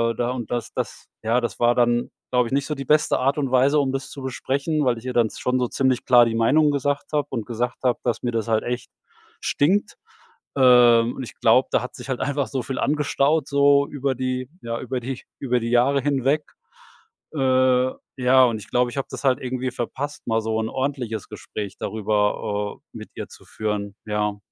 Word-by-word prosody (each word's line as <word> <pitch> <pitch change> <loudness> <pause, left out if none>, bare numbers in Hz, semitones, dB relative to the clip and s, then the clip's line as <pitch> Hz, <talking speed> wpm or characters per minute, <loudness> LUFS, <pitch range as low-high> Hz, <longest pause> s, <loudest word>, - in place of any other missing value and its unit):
da 120 +1 -1
und 120 -4 -5
das 120 -1 -3
das - - -5 0.2
ja, 120 +3 +2
das 120 - -4
war 120 0 +4
dann, 120 0 +2 0.2
glaube 125 -2 +2
ich 130 - -6
nicht 140 0 0
so 150 - -2
die 135 -1 -6
beste 150 +2 +3
Art 135 +3 +1
und 135 -3 -1
Weise, 135 +4 +4
um 135 -2 +1
das 135 0 -4
zu 140 - -8
besprechen, 140 +3 -1
weil 120 -2 +2
ich 120 - -16
ihr 125 - -3
dann 115 -2 +3
z - - -10
schon 125 0 +1
so 125 - +1
ziemlich 130 -1 0
klar 120 -1 +7
die 115 -1 -1
Meinung 145 +6 +4
gesagt 145 +1 -1
habe 145 -1 +1
und 115 -5 -3
gesagt 120 +1 -2
habe, 125 -2 +1
dass 120 - -1
mir 120 - 0
das 115 0 -2
halt 110 -1 +1
echt 125 0 -4 0.5
stinkt. 195 +9 +1 0.6
Ähm, 120 -3 +6
und 130 - -5
ich 110 - -9
glaube, - - +4
da - - +2
hat - - -7
sich - - -10
halt 130 - -2
einfach 140 0 0
so 135 -3 -3
viel 130 +1 -5
angestaut, 150 0 +1
so 140 0 +4
über 140 -2 -1
die 130 0 -3
ja 115 0 -4
über 130 0 -3
die 130 +1 -6 0.2
über 125 -2 0
die 115 0 -3
Jahre 130 +3 +3
hinweg. 140 +2 +1 0.9
Äh, 130 -1 +3 0.3
ja, 130 +1 +5
und 115 -2 0
ich 100 - -13
glaube, 125 0 +1
ich - - -9
habe 135 - -2
das - - -7
halt 130 0 +3
irgendwie 130 0 -3
verpasst, 135 +4 -5
mal 110 0 +1
so 110 0 -1
'n 110 0 -2
ordentliches 130 -6 -3
Gespräch 105 -2 -7
darüber, 105 -1 -1 0.2
äh, - - -8
mit - - -9
ihr - - -6
zu - - -15
führen. 105 -2 -4
Ja. 105 -1 -1
125 Hz, 215 wpm, -23 LUFS, 115-135 Hz, 0.9 s, klar